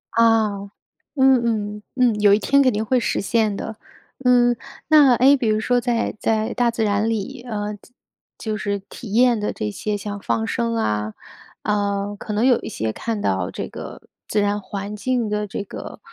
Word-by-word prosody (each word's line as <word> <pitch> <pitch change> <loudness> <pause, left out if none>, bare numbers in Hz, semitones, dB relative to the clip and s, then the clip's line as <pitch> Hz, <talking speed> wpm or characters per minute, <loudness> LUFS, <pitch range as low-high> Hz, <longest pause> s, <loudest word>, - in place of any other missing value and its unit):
啊， 225 -2 +4
嗯 200 0 -8 0.4
嗯。 235 -6 +2
嗯， 240 -5 +2
有 205 -1 +6
一 205 - +4
天 280 +6 +3
肯 255 -2 +4
定 210 +1 -1
会 255 +2 +2
实 - - -1
现 215 -1 +1
的。 220 +1 -6 0.5
嗯， 245 -1 +4 0.3
那 295 -5 +7
诶 270 +4 +6
比 245 -4 -1
如 215 0 +2
说 245 +2 +1
在 235 -3 -1
在 220 +1 0
大 245 -1 +2
自 225 -1 -1
然 210 +2 +1
里 225 +4 -3
呃， 210 -1 -3
就 205 - -20 0.5
就 215 -1 -3
是 200 -1 -2
体 220 -6 -8
验 240 0 +4
的 210 - -1
这 105 - -3
些 210 - -3
像 205 0 -5
放 225 +2 -1
生 230 -1 -1
啊， 105 - -1 0.5
呃， 205 -1 -1
可 215 - -6
能 215 +4 +1
有 250 -3 +4
一 - - -6
些 110 0 -3
看 225 -2 -3
到 95 -1 0
这 - - -5
个 - - -9 0.2
自 215 - 0
然 205 0 +1
环 200 +2 -6
境 245 +1 -1
的 210 0 -1
这 200 - -4
个 200 - -9
215 Hz, 205 characters per minute, -22 LUFS, 205-240 Hz, 0.5 s, 那